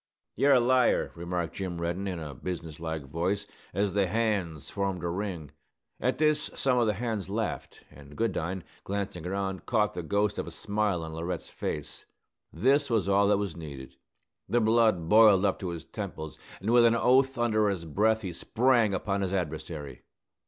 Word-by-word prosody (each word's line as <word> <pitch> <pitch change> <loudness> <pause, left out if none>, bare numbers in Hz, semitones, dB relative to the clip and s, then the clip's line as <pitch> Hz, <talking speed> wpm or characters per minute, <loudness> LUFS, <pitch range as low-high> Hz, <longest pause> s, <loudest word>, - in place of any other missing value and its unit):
"You're 140 0 +4
a 130 - +6
liar!" 125 +1 +3
remarked 85 0 -3
Jim 90 -3 -4
Reddin, 85 +4 -2
in 90 -2 -3
a 75 -3 -6
business 80 +2 -6
like 80 -2 -4
voice, 90 +8 -1 0.3
as 100 +1 0
the 100 -1 +2
hands 95 -8 -1
formed 95 -3 -2
a - - 0
ring. 85 -5 -4 0.5
At - - 0
this 150 0 +2
some 125 -2 +2
of 120 - +3
the 105 - +2
hands 110 -3 -3
laughed, 110 +2 -4
and 70 +1 -14
Goodine, 95 -5 -1 0.2
glancing 95 -4 -4
around, 95 0 -3
caught 105 -4 +2
the 90 - -4
ghost 100 +4 0
of - - -3
a - - -4
smile 100 0 -1
on 80 0 -6
Laurette's 85 +1 -4
face. 75 +1 -5 0.5
This 140 - +2
was 110 -5 +1
all 100 +1 +4
that 100 0 +4
was 100 -4 -3
needed. 70 -5 -9 0.5
The 120 - +3
blood 110 -6 +3
boiled 105 -1 +6
up 95 - +1
to 95 - -3
his 85 -2 -6
temples, 80 -8 -6 0.2
and 105 +5 -1
with 120 0 +6
an 115 0 +5
oath 130 +3 +3
under 110 -3 +2
his 90 -4 -3
breath 110 +7 +1
he 90 -2 -4
sprang 115 +1 +2
upon 100 +1 -1
his 95 0 -1
adversary. 80 -4 -4
95 Hz, 180 wpm, -28 LUFS, 85-110 Hz, 0.5 s, a